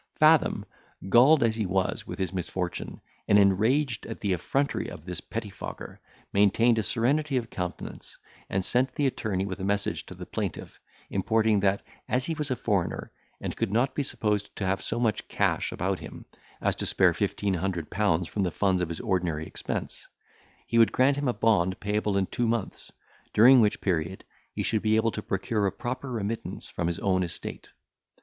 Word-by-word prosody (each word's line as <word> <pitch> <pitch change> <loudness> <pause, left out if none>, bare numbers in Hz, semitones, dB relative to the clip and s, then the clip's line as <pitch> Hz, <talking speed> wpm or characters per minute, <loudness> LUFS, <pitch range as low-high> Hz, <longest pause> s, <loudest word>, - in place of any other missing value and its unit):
Fathom, - - +4 0.4
galled 130 +7 +6
as 115 -1 +2
he 110 -4 0
was 95 0 -1
with - - -6
his 95 -1 -2
misfortune, 90 -1 -4 0.3
and 100 - +6
enraged 110 +6 +2
at - - -6
the 100 -3 0
effrontery 135 +11 -1
of 80 - -10
this 90 -2 -3
pettifogger, 110 -3 -7 0.3
maintained 110 +4 +4
a - - +2
serenity 135 +6 +1
of 115 -2 -3
countenance, 90 -1 -6 0.3
and 95 -1 0
sent 130 +1 +2
the 145 - +1
attorney 105 -7 -1
with 95 -1 -5
a - - -5
message 100 +1 -1
to - - -9
the - - -8
plaintiff, - - -5 0.3
importing, 110 +2 +2
that, 100 0 +1 0.3
as 125 +1 +2
he 165 - -1
was 150 -2 -3
a 130 - +1
foreigner, 100 -8 -1 0.3
and - - -4
could 115 -4 -1
not 120 +5 +2
be - - -1
supposed 105 -6 -1
to 100 - -3
have 95 +1 0
so 115 - -2
much 115 -4 0
cash - - 0
about - - -1
him, - - -10 0.4
as - - +1
to - - -1
spare - - +4
fifteen 100 -1 -1
hundred 90 -2 -2
pounds 90 -4 +1
from 105 - -3
the 95 - +1
funds 95 +1 +1
of 90 - -1
his 85 - -4
ordinary 90 -7 -1
expense, - - -5 0.6
he 115 - +2
would 115 - +6
grant 135 +2 +3
him 145 -1 -1
a 125 - +2
bond 100 -5 +2
payable 105 0 0
in 95 - +2
two 120 +5 -1
months, 115 -3 -2 0.4
during 125 +3 +8
which 105 -2 +2
period 90 0 -1 0.3
he - - -3
should 110 - +1
be 110 0 +2
able 110 +1 +2
to 105 - -4
procure 100 +1 -1
a - - 0
proper 125 +5 -5
remittance 115 -1 -4
from 85 - -2
his 85 - -1
own 95 -2 +1
estate. 85 -2 -6
105 Hz, 190 wpm, -27 LUFS, 95-115 Hz, 0.6 s, during